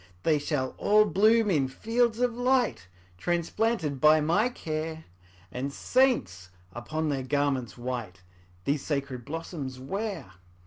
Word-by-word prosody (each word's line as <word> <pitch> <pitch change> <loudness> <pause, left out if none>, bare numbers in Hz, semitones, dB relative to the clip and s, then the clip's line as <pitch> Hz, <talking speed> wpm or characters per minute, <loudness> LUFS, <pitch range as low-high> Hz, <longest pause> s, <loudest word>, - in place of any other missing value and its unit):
``They 155 -2 +2
shall 145 -3 -1
all 210 +1 +5
bloom 215 +2 +4
in 140 -6 +2
fields 225 - 0
of 245 -1 +2
light, 245 - +1 0.3
Transplanted 175 - -1
by 155 +1 +7
my 175 +10 +2
care, 160 -6 -4 0.5
And 135 +3 -3
saints, 100 - +1 0.2
upon 155 +7 -3
their 140 -2 -1
garments 135 -3 -1
white, 120 -7 -5 0.4
These 145 0 0
sacred 140 -4 -3
blossoms 145 -4 -6
wear.'' 195 +7 -4
155 Hz, 125 wpm, -28 LUFS, 130-210 Hz, 0.5 s, by